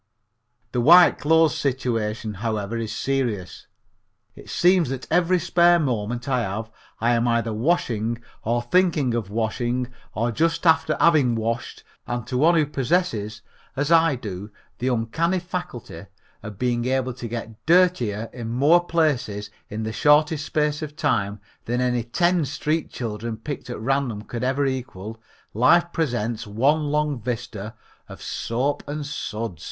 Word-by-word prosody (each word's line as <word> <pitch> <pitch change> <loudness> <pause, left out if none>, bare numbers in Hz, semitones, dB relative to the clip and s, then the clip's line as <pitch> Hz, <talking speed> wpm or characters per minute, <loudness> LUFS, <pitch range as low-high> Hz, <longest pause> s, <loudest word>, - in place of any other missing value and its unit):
The 125 - 0
white 175 +7 +7
clothes 160 +1 +4
situation, 115 -5 -2
however, 110 -1 -2
is 115 -2 -3
serious. 115 -7 -2 0.7
It - - -14
seems 175 -4 +3
that 130 -1 -4
every 175 +2 +3
spare 175 0 +4
moment 120 -4 -2
I 130 -2 +1
have 110 +2 -4 0.3
I 120 +2 +2
am 120 +1 +1
either 115 -1 +1
washing 115 -3 0 0.2
or 120 +2 0
thinking 155 -2 +2
of 115 -4 -2
washing 120 +3 -1 0.3
or 115 +3 0
just 165 +7 0
after 160 -1 +3
having 145 -8 +4
washed, 115 +1 -3 0.2
and 120 -1 -3
to 125 - -3
one 165 +4 +5
who 155 -2 +3
possesses 125 - -1 0.3
as 145 +3 -1
I 165 -3 +5
do 105 -4 -7 0.3
the 125 - -1
uncanny 130 +10 0
faculty 175 - -6 0.3
of 105 -2 -8
being 120 0 0
able 130 0 0
to 120 -1 -7
get 115 -1 -7
dirtier 160 - +3
in 120 -3 -6
more 145 +9 +4
places 140 -12 0 0.2
in 110 +2 -4
the 110 0 -3
shortest 150 +2 +3
space 150 0 0
of 150 -1 -6
time 105 -9 0 0.3
than 120 +2 -1
any 125 -1 +1
ten 175 +9 +1
street 155 +3 -2
children 115 -1 -5
picked 140 +3 -6
at 120 - -5
random 120 -3 -1
could 120 +2 -5
ever 135 +2 +1
equal, 115 -5 -5 0.3
life 170 +10 +4
presents 120 -8 -2
one 140 +9 +2
long 150 -3 0
vista 115 -2 -5 0.3
of - - -10
soap 130 +5 -2
and 145 0 -4
suds. 110 - -5
125 Hz, 150 wpm, -23 LUFS, 115-150 Hz, 0.7 s, white